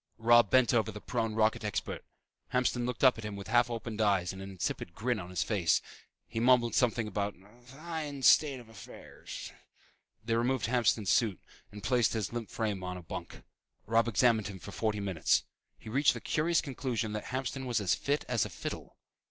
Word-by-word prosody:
Robb 120 Hz, -1 st, +5 dB
bent 130 Hz, -1 st, +4 dB
over 110 Hz, -2 st, +2 dB
the 105 Hz, -, -8 dB
prone 115 Hz, -1 st, -2 dB
rocket 110 Hz, 0 st, +2 dB
expert. 105 Hz, -1 st, -3 dB, 0.5 s
Hamston 125 Hz, -1 st, +1 dB
looked 125 Hz, 0 st, -4 dB
up 130 Hz, -3 st, +6 dB
at -, -, -7 dB
him 105 Hz, -1 st, -5 dB
with 100 Hz, +1 st, -8 dB
half 120 Hz, +1 st, +4 dB
opened 115 Hz, -1 st, -4 dB
eyes 95 Hz, -4 st, +2 dB
and 95 Hz, -, -9 dB
an 95 Hz, -, -7 dB
insipid 85 Hz, -2 st, -4 dB
grin 120 Hz, 0 st, -1 dB
on 90 Hz, -2 st, -7 dB
his 90 Hz, -, -1 dB
face. 95 Hz, -7 st, +2 dB, 0.5 s
He 115 Hz, -, -4 dB
mumbled 120 Hz, -1 st, +4 dB
something 120 Hz, -3 st, +2 dB
about 100 Hz, 0 st, -2 dB
"a 105 Hz, +6 st, -21 dB
fine 145 Hz, +2 st, -6 dB
state 140 Hz, 0 st, +5 dB
of 120 Hz, -, -13 dB
affairs." 110 Hz, -5 st, -10 dB, 0.7 s
They 115 Hz, -, 0 dB
removed 120 Hz, +1 st, +1 dB
Hamston's 115 Hz, -5 st, +2 dB
suit 110 Hz, -7 st, +2 dB, 0.3 s
and 105 Hz, -1 st, -10 dB
placed 120 Hz, -2 st, +2 dB
his 110 Hz, -2 st, -2 dB
limp 120 Hz, -2 st, -4 dB
frame 105 Hz, -4 st, -2 dB
on 90 Hz, 0 st, -4 dB
a 90 Hz, -, -10 dB
bunk. 85 Hz, +1 st, -8 dB, 0.4 s
Robb 115 Hz, +2 st, +2 dB
examined 115 Hz, -1 st, +3 dB
him 100 Hz, -2 st, -7 dB
for 100 Hz, -, -10 dB
forty 105 Hz, 0 st, -1 dB
minutes. 95 Hz, -6 st, +1 dB, 0.3 s
He -, -, -15 dB
reached 135 Hz, +6 st, +3 dB
the -, -, -5 dB
curious 165 Hz, +2 st, +1 dB
conclusion 125 Hz, -5 st, -3 dB
that 105 Hz, -, -4 dB
Hamston 130 Hz, +1 st, -3 dB
was 120 Hz, -3 st, +1 dB
as 100 Hz, -3 st, +1 dB
fit 145 Hz, +1 st, -1 dB
as 120 Hz, -5 st, +1 dB
a -, -, -4 dB
fiddle. -, -, -7 dB
115 Hz, 195 wpm, -31 LUFS, 105-125 Hz, 0.7 s, up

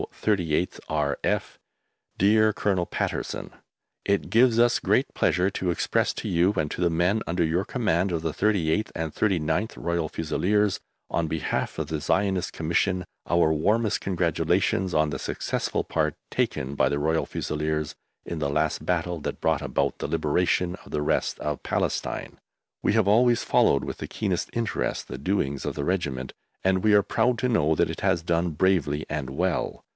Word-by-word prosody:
38TH 90 Hz, -5 st, 0 dB
R.F. 75 Hz, -2 st, -1 dB, 0.6 s
DEAR 110 Hz, +2 st, +4 dB
COLONEL 95 Hz, -4 st, 0 dB
PATTERSON, -, -, -3 dB, 0.5 s
It 100 Hz, 0 st, 0 dB
gives 120 Hz, 0 st, +5 dB
us 120 Hz, 0 st, +4 dB
great -, -, +1 dB
pleasure 90 Hz, +3 st, +2 dB
to 95 Hz, -2 st, -2 dB
express 85 Hz, -, +1 dB
to -, -, -5 dB
you 90 Hz, +4 st, +3 dB
and 75 Hz, -2 st, 0 dB
to -, -, -4 dB
the 85 Hz, -, +3 dB
men 90 Hz, +6 st, +1 dB
under 85 Hz, +1 st, +1 dB
your 85 Hz, +4 st, +1 dB
command 100 Hz, -6 st, 0 dB
of 80 Hz, -2 st, -2 dB
the 80 Hz, -2 st, -1 dB
38th 100 Hz, -1 st, +1 dB
and 80 Hz, -2 st, -3 dB
39th 95 Hz, +1 st, 0 dB
Royal 85 Hz, -2 st, -1 dB
Fusiliers, 100 Hz, +6 st, 0 dB, 0.3 s
on 85 Hz, -1 st, 0 dB
behalf 80 Hz, 0 st, -2 dB
of -, -, -2 dB
the 80 Hz, -2 st, -3 dB
Zionist 95 Hz, +1 st, 0 dB
Commission, 90 Hz, +3 st, 0 dB, 0.2 s
our 85 Hz, -2 st, +4 dB
warmest 105 Hz, +8 st, +1 dB
congratulations 90 Hz, +1 st, 0 dB
on 75 Hz, -1 st, +2 dB
the 65 Hz, -, -3 dB
successful -, -, -2 dB
part -, -, -1 dB, 0.2 s
taken 65 Hz, +1 st, -1 dB
by -, -, +2 dB
the 70 Hz, -, -1 dB
Royal 80 Hz, +2 st, +1 dB
Fusiliers 75 Hz, 0 st, -2 dB, 0.3 s
in 85 Hz, -, -4 dB
the 75 Hz, -2 st, 0 dB
last 75 Hz, +2 st, 0 dB
battle 90 Hz, -1 st, -1 dB
that -, -, -5 dB
brought -, -, +1 dB
about -, -, -1 dB
the -, -, -2 dB
liberation 90 Hz, 0 st, +1 dB
of -, -, -14 dB
the 75 Hz, -, -1 dB
rest -, -, 0 dB
of 75 Hz, -1 st, -3 dB
Palestine. -, -, -2 dB, 0.4 s
We -, -, +2 dB
have 110 Hz, -3 st, +3 dB
always 120 Hz, +3 st, +4 dB
followed 70 Hz, -, +3 dB
with -, -, -5 dB
the -, -, -5 dB
keenest 95 Hz, -5 st, -2 dB
interest 115 Hz, -1 st, -2 dB
the 65 Hz, -, -6 dB
doings 70 Hz, -4 st, -1 dB
of -, -, -3 dB
the 70 Hz, -, -2 dB
Regiment, 70 Hz, -9 st, -2 dB, 0.3 s
and 95 Hz, -1 st, +2 dB
we 110 Hz, -1 st, +4 dB
are 100 Hz, -1 st, +6 dB
proud 115 Hz, +4 st, +1 dB
to 125 Hz, -, +1 dB
know 80 Hz, -10 st, +3 dB
that -, -, +2 dB
it -, -, -7 dB
has 85 Hz, -, +2 dB
done 85 Hz, +1 st, +1 dB
bravely 80 Hz, -3 st, +1 dB
and 75 Hz, -3 st, -3 dB
well. 90 Hz, +4 st, -1 dB
85 Hz, 170 wpm, -26 LUFS, 80-100 Hz, 0.6 s, are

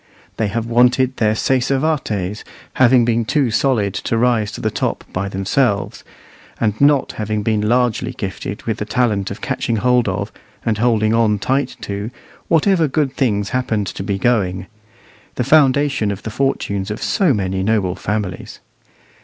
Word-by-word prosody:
They 110 Hz, -, 0 dB
have 110 Hz, +3 st, -2 dB
wanted 125 Hz, +2 st, +2 dB
their 110 Hz, -1 st, +2 dB
sacer 130 Hz, +3 st, +1 dB
vates, 110 Hz, -, -2 dB, 0.3 s
having 125 Hz, -1 st, +4 dB
been 115 Hz, 0 st, +1 dB
too 130 Hz, +1 st, +1 dB
solid 110 Hz, -5 st, +1 dB
to 115 Hz, -, -2 dB
rise 115 Hz, -3 st, +1 dB
to -, -, -6 dB
the 110 Hz, -, -1 dB
top -, -, -2 dB
by 100 Hz, +2 st, -2 dB
themselves, 100 Hz, +3 st, -1 dB, 0.6 s
and 110 Hz, 0 st, -1 dB
not 140 Hz, -1 st, +4 dB
having 105 Hz, -1 st, -3 dB
been 110 Hz, -1 st, +1 dB
largely 120 Hz, +2 st, +1 dB
gifted 100 Hz, -4 st, -6 dB
with 110 Hz, -2 st, -2 dB
the 105 Hz, -, -2 dB
talent 105 Hz, -4 st, 0 dB
of 100 Hz, -, -8 dB
catching 130 Hz, -4 st, -2 dB
hold 125 Hz, +2 st, +2 dB
of, -, -, -3 dB, 0.3 s
and 110 Hz, -2 st, 0 dB
holding 110 Hz, -2 st, +2 dB
on 115 Hz, -2 st, +3 dB
tight 130 Hz, +6 st, -1 dB
to, 100 Hz, +2 st, -4 dB, 0.4 s
whatever 165 Hz, 0 st, +3 dB
good 140 Hz, -1 st, 0 dB
things 105 Hz, -7 st, 0 dB
happened 115 Hz, -5 st, -1 dB
to 95 Hz, -, -6 dB
be 100 Hz, 0 st, -2 dB
going 95 Hz, -6 st, 0 dB, 0.7 s
the 125 Hz, -, 0 dB
foundation 140 Hz, -4 st, +3 dB
of 100 Hz, -2 st, -5 dB
the 110 Hz, -, -5 dB
fortunes 100 Hz, -6 st, -1 dB
of 105 Hz, -, -4 dB
so 185 Hz, -6 st, +2 dB
many 95 Hz, -4 st, -1 dB
noble 100 Hz, -3 st, +1 dB
families. 100 Hz, -1 st, -4 dB
115 Hz, 160 wpm, -18 LUFS, 100-130 Hz, 0.7 s, having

